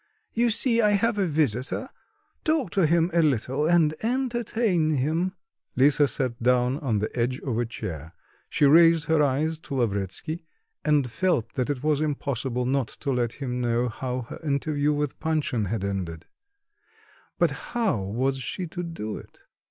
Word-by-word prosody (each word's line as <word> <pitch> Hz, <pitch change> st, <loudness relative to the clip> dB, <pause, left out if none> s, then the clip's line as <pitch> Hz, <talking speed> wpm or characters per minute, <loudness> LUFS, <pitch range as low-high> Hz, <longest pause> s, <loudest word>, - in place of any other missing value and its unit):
You 235 Hz, +1 st, +2 dB
see 235 Hz, +1 st, +3 dB
I 210 Hz, -1 st, +4 dB
have 210 Hz, +1 st, +1 dB
a 190 Hz, -, +2 dB
visitor; 145 Hz, -, 0 dB, 0.6 s
talk 310 Hz, -, +1 dB
to 190 Hz, -5 st, +3 dB
him 170 Hz, +2 st, +2 dB
a 170 Hz, -, +4 dB
little, 140 Hz, 0 st, +1 dB
and 165 Hz, -3 st, +4 dB
entertain 230 Hz, -, +1 dB
him." 160 Hz, +8 st, 0 dB, 0.4 s
Lisa 140 Hz, +2 st, +5 dB
sat 125 Hz, -2 st, -2 dB
down 125 Hz, +2 st, +2 dB
on 130 Hz, -9 st, 0 dB
the 105 Hz, +1 st, -3 dB
edge 125 Hz, +2 st, 0 dB
of 120 Hz, -4 st, -2 dB
a 120 Hz, -, 0 dB
chair; 85 Hz, -7 st, -7 dB, 0.3 s
she -, -, +2 dB
raised 165 Hz, +2 st, +6 dB
her 160 Hz, 0 st, +3 dB
eyes 150 Hz, +3 st, +1 dB
to 140 Hz, -, -7 dB
Lavretsky 115 Hz, -, -2 dB, 0.4 s
and 150 Hz, -4 st, +3 dB
felt 180 Hz, -7 st, 0 dB
that 130 Hz, -1 st, -1 dB
it 140 Hz, -2 st, -2 dB
was 150 Hz, -1 st, +2 dB
impossible 130 Hz, -4 st, -1 dB
not 130 Hz, -1 st, +1 dB
to 140 Hz, -, -4 dB
let 120 Hz, -3 st, 0 dB
him 125 Hz, -3 st, -4 dB
know 120 Hz, 0 st, +1 dB
how 125 Hz, +2 st, -3 dB
her 115 Hz, -, -9 dB
interview 145 Hz, 0 st, 0 dB
with 145 Hz, -2 st, -2 dB
Panshin 150 Hz, -8 st, 0 dB
had 100 Hz, +1 st, -2 dB
ended. 90 Hz, -5 st, -3 dB, 1.1 s
But -, -, +3 dB
how 230 Hz, -, -1 dB
was 130 Hz, +8 st, -1 dB
she 180 Hz, +8 st, -4 dB
to 175 Hz, +2 st, -5 dB
do 165 Hz, -12 st, -5 dB
it? -, -, -14 dB
145 Hz, 165 wpm, -26 LUFS, 125-165 Hz, 1.1 s, raised